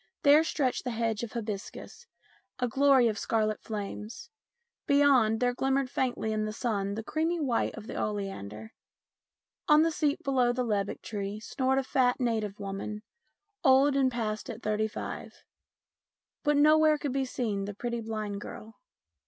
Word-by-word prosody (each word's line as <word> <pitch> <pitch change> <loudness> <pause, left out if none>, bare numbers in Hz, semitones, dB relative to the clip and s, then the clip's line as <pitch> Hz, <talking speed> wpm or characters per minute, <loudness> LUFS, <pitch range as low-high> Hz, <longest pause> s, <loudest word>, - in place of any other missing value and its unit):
There 295 +2 +7
stretched 270 -5 -1
the 250 - -3
hedge 225 -2 -1
of 235 -2 -6
hibiscus, 220 - -6 0.5
a 250 - 0
glory 270 0 +4
of 215 -2 -1
scarlet 215 -2 0
flames. 215 +2 -6 0.6
Beyond, 275 -6 +4
there 245 0 +2
glimmered 270 +1 0
faintly 245 -5 -1
in 215 0 -1
the 215 - -3
sun 205 -3 -2
the 225 - -4
creamy 325 +7 -1
white 260 -7 0
of 220 - -9
the - - -7
oleander. 110 - -5 0.9
On 300 0 +6
the 330 - +2
seat 305 +1 0
below 255 -4 +2
the 250 +1 -1
lebbek 205 -3 -2
tree 205 -1 -4
snored 260 +4 0
a 270 - +2
fat 255 -1 +2
native 220 -5 -1
woman, 200 +2 -5 0.6
old 270 0 +5
and 265 -2 +3
past 220 -3 -3
at 230 0 -7
thirty 215 0 0
five. 215 - -7 1.0
But 295 -2 +3
nowhere 310 +1 +5
could 285 -3 -3
be 270 0 +1
seen 215 -6 -2
the 205 -1 -6
pretty 235 +2 -3
blind 215 -2 -4
girl. 220 +1 -10
235 Hz, 160 wpm, -29 LUFS, 215-270 Hz, 1.0 s, There